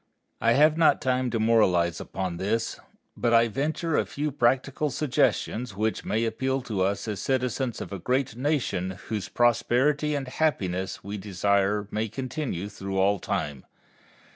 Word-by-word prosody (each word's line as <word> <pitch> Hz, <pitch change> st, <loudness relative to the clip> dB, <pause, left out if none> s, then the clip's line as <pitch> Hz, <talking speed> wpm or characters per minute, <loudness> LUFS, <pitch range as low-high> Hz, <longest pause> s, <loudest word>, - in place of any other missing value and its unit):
I 115 Hz, -, +4 dB
have 155 Hz, +4 st, +4 dB
not 160 Hz, -, +5 dB
time 130 Hz, -1 st, 0 dB
to 115 Hz, -1 st, -1 dB
moralize 95 Hz, -7 st, +3 dB
upon 90 Hz, -3 st, -4 dB
this, 110 Hz, +5 st, -1 dB, 0.4 s
but 120 Hz, -1 st, +2 dB
I 115 Hz, 0 st, +5 dB
venture 155 Hz, -, -1 dB
a -, -, +3 dB
few 150 Hz, +1 st, -2 dB
practical 135 Hz, +3 st, +1 dB
suggestions 125 Hz, -5 st, 0 dB
which 110 Hz, +2 st, -1 dB
may 110 Hz, +2 st, 0 dB
appeal 130 Hz, +4 st, -1 dB
to 110 Hz, -7 st, -2 dB
us 100 Hz, +4 st, 0 dB
as 105 Hz, -3 st, -3 dB
citizens 130 Hz, -2 st, -1 dB
of -, -, -6 dB
a 100 Hz, -, -4 dB
great 125 Hz, +4 st, 0 dB
nation 120 Hz, -, -1 dB
whose 105 Hz, -4 st, -3 dB
prosperity 130 Hz, +5 st, +2 dB
and 135 Hz, -2 st, -3 dB
happiness 95 Hz, -, -1 dB
we 100 Hz, +1 st, -5 dB
desire 100 Hz, +1 st, +1 dB
may 110 Hz, +1 st, -1 dB
continue 130 Hz, -, -4 dB
through 95 Hz, -2 st, -5 dB
all 100 Hz, +1 st, +3 dB
time. 70 Hz, -5 st, -3 dB
115 Hz, 155 wpm, -26 LUFS, 100-135 Hz, 0.4 s, not